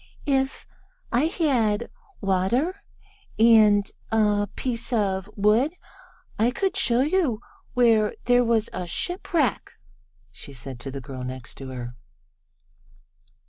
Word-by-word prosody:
"If 270 -1 0 0.5
I 245 +5 +2
had 255 - +1 0.3
water 205 - 0 0.6
and 215 -3 +5 0.2
a 210 -2 +2
piece 245 -1 -2
of 200 -4 0
wood 220 - +2 0.6
I 225 +2 +4
could 385 +10 -1
show 250 -10 +4
you 295 - +1 0.4
where 225 -4 +3
there 245 0 +4
was 230 -1 +1
a 180 - -4
shipwreck," 335 - -1 0.6
she 140 +3 -9
said 130 0 -4
to 135 - -5
the 135 0 -6
girl 130 -1 -8
next 130 -1 -6
to 135 - -7
her. 125 -1 -7
220 Hz, 115 wpm, -24 LUFS, 190-255 Hz, 0.6 s, and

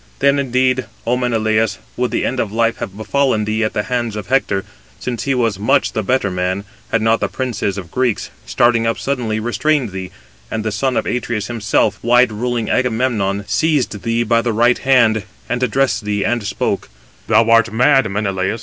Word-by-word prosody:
Then, 140 0 +3
indeed, 130 -1 +1 0.2
Ο 120 - +2
Menelaus, 110 -4 +1 0.2
would 125 0 0
the - - -1
end 130 - -2
of 105 - -1
life 115 +1 +1
have 100 -4 -6
befallen 110 0 +1
thee 110 +1 0
at 110 - -1
the 105 - -1
hands 120 -3 -2
of 105 - -5
Hector, 115 -7 +1 0.3
since 120 -2 -4
he 135 -1 +1
was 115 -6 0
much 105 - +2
the 110 - -1
better 105 -1 0
man, 90 +2 -1 0.3
had 115 -1 +1
not 115 0 +3
the - - 0
princes 110 -6 -3
of 90 -4 -7
the - - -25
Greeks, 125 -4 0
starting 115 - +2
up 115 - 0
suddenly, 120 -6 -2
restrained 125 +2 0
thee, 95 -1 -6 0.4
and 110 -1 -3
the 110 - 0
son 125 +4 0
of - - 0
Atreus 120 -3 -2
himself, 105 -2 0
wide 120 0 +4
ruling 120 +1 -2
Agamemnon, 110 -5 0
seized 145 -10 0
thee 115 +1 0
by 115 +1 +2
the 120 -1 -1
right 120 +3 +3
hand, 120 -5 +3 0.3
and 120 0 -2
addressed 125 0 +1
thee, 105 -1 -1
and 120 -1 0
spoke: - - -2 0.4
"Thou 115 - +4
art 115 0 +5
mad, 130 +3 +4
O - - -6
Menelaus! 100 +1 -1
115 Hz, 195 wpm, -18 LUFS, 105-125 Hz, 0.4 s, art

